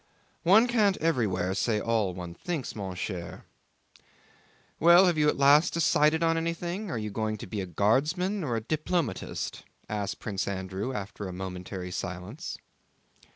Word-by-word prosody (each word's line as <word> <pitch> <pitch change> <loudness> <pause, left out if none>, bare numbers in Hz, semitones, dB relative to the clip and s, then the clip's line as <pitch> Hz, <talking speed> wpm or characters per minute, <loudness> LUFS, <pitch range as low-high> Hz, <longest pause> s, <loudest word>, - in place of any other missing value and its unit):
"One 195 +7 +6
can't 215 -5 +2
everywhere 105 - 0
say 105 +2 +1
all 105 -4 0
one 90 -2 -6
thinks, 155 - -4
mon 95 -4 -5
cher. 90 -2 -5 1.3
Well, 170 +3 +7
have 175 -2 +3
you 150 -1 +3
at - - -1
last 145 +5 +5
decided 160 -1 +3
on 165 0 +3
anything? 170 +5 -3
Are 140 - -2
you 105 -1 -4
going 110 +1 -2
to - - -8
be 100 +2 -4
a 95 - -5
guardsman 155 - +1
or 125 -6 -1
a 115 - -1
diplomatist?" 155 +2 -2 0.3
asked 105 -2 -3
Prince 100 -3 -3
Andrew 95 +4 -3
after 105 -3 -5
a 90 - -6
momentary 90 0 -6
silence. 90 - -5
115 Hz, 155 wpm, -28 LUFS, -, 1.3 s, Well